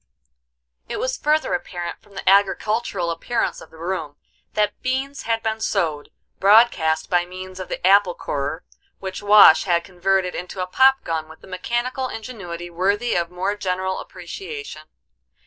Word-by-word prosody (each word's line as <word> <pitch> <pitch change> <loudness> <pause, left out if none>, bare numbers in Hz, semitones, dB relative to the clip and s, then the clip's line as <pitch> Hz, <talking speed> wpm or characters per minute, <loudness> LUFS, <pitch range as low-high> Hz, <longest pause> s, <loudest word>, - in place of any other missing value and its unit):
It - - -3
was - - -1
further 305 0 +1
apparent 175 -9 -4
from 200 - -21
the 195 - -7
agricultural 200 -1 +2
appearance 170 +8 -2
of - - -13
the 160 - -16
room 165 -3 -4 0.4
that 210 -1 0
beans 270 +2 -2
had 225 0 +1
been 220 0 -2
sowed 160 -9 -1 0.3
broadcast 190 -7 +4
by 175 -1 +2
means 185 +1 -9
of 185 - -6
the - - -4
apple 195 -1 +5
corer, 145 +4 -3 0.3
which 190 -1 -6
Wash 205 -5 +7
had 170 -2 +2
converted 185 +1 0
into 180 +1 -6
a 185 - 0
pop 265 +8 +4
gun 160 -1 -3
with 160 - -15
a - - -13
mechanical 240 +8 -2
ingenuity 175 -7 -7
worthy 200 +7 0
of 170 -1 0
more 185 +3 -2
general 190 -1 -2
appreciation. 395 - -8
190 Hz, 155 wpm, -22 LUFS, 175-225 Hz, 0.4 s, Wash